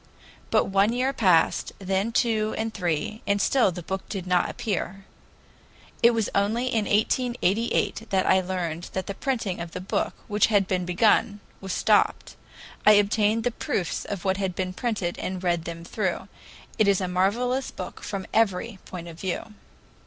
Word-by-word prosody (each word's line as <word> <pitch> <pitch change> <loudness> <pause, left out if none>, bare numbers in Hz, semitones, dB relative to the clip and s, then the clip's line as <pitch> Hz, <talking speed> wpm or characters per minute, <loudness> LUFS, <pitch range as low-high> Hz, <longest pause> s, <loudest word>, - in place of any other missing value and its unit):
But - - +4
one 200 +3 +2
year 255 +2 0
passed, 180 -9 +3
then 195 +3 -1
two 220 -2 +1
and 220 0 -2
three, 180 +3 -2
and 200 0 +2
still 240 -1 +3
the 175 0 -7
book 190 +3 -5
did 195 -4 -4
not 180 -1 +2
appear. 195 -2 -3 1.0
It 235 - +7
was 225 -3 0
only 215 +5 +1
in 230 -4 0
1888 225 0 0
that 190 -2 +1
I 190 - +4
learned 175 -2 -3
that 190 - -2
the 200 - -4
printing 225 -5 -2
of 170 0 -6
the - - -4
book, 185 - -2
which 210 0 +3
had 205 -3 +2
been 180 -2 -1
begun, 205 +3 +2 0.2
was 190 -1 -6
stopped. - - +2 0.5
I 215 - +8
obtained 210 +2 +3
the 245 - +1
proofs 185 -5 -2
of 200 -3 -6
what 190 0 +1
had 190 -3 -2
been 185 0 -2
printed 200 -5 -2
and 185 0 -4
read 170 -2 0
them 170 0 -6
through. 190 0 -2 0.5
It 215 - +4
is 200 -2 +4
a 185 - -1
marvelous 235 +9 0
book 180 - -8
from 195 -2 -4
every 215 -1 +1
point 175 -2 -8
of 165 -1 -10
view. 195 +4 -4
195 Hz, 175 wpm, -25 LUFS, 185-220 Hz, 1.0 s, I